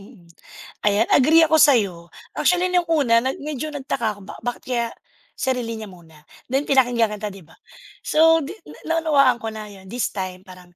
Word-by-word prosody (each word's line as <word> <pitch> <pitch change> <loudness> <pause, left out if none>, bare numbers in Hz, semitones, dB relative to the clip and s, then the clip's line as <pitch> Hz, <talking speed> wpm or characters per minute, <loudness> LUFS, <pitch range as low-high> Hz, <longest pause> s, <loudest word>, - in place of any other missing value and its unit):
mm. 200 -3 -17 0.6
Ayan, 210 +2 +2
agree 320 +5 +6
ako 315 - +3
sa 290 - +7
'yo. 175 -4 -6 0.2
Actually, 360 0 +2
no'ng 360 -1 +1
una 240 -7 +3
na 260 - 0
medyo 300 +1 -5
nagtaka 250 -6 -3
ako, - - -15
ba - - -9
bakit 245 +1 -4
kaya 240 -2 -1 0.5
sarili 250 -4 -2
niya 215 - -7
muna? 165 -4 -17 0.3
Then 275 +2 0
pinakinggan 245 -5 +2
kita 210 0 -5
'di 195 -2 -13
ba? 165 - -20 0.5
So, 325 0 +4
di 305 +7 -7
na 330 +1 -3
naunawaan 275 -6 +3
ko 225 - -6
na 215 -1 -8
'yon. 190 -1 -14
"This 245 +5 -3
time," 185 -2 -6
parang 180 -2 -16
240 Hz, 190 wpm, -22 LUFS, 200-290 Hz, 0.6 s, sa